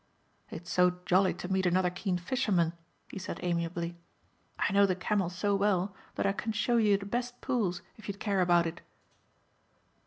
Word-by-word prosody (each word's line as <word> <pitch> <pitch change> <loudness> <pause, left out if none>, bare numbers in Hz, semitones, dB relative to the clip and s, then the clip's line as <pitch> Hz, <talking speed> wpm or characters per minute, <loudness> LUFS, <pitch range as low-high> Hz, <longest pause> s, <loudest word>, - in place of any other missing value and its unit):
"It's 175 +2 -8
so 180 0 +4
jolly 185 +1 +3
to - - -6
meet 190 0 +1
another 180 0 +2
keen 180 0 -1
fisherman," 180 -4 +1 0.4
he - - -6
said 185 - -5
amiably, 170 0 -2 0.6
"I 195 - 0
know 200 0 +6
the 185 - +1
Camel 190 0 0
so 200 +3 -1
well 195 -1 +1 0.2
that - - -1
I 195 - +3
can 220 +2 -3
show 235 +3 +1
you 210 -3 +4
the 200 - -8
best 245 +4 -3
pools 200 -9 -1
if 220 - -12
you'd 200 -1 -5
care 200 -3 +1
about 175 -1 +4
it." 165 0 -5
190 Hz, 180 wpm, -30 LUFS, 175-205 Hz, 0.6 s, know